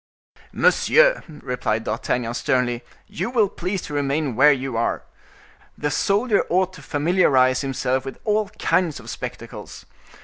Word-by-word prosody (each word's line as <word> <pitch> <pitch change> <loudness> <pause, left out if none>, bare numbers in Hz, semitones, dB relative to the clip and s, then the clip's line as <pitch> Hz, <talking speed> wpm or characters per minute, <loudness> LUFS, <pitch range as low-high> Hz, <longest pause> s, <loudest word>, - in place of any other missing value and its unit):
"Monsieur," - - +4
replied 125 -7 -3
D'Artagnan, 115 +2 -2
sternly, 120 -1 0 0.2
"you 210 +2 -4
will 230 -4 +3
please 185 +1 -4
to 150 - -7
remain 145 -2 -1
where 150 +6 +6
you 135 -3 -2
are. 115 - -1 0.7
The 150 - -2
soldier 205 - +2
ought 185 +1 +1
to 170 - -12
familiarize 145 -4 +2
himself 130 -1 -1
with 135 - -7
all 215 -1 +1
kinds 175 -5 +1
of - - -8
spectacles. - - -8
145 Hz, 135 wpm, -22 LUFS, 130-190 Hz, 0.7 s, where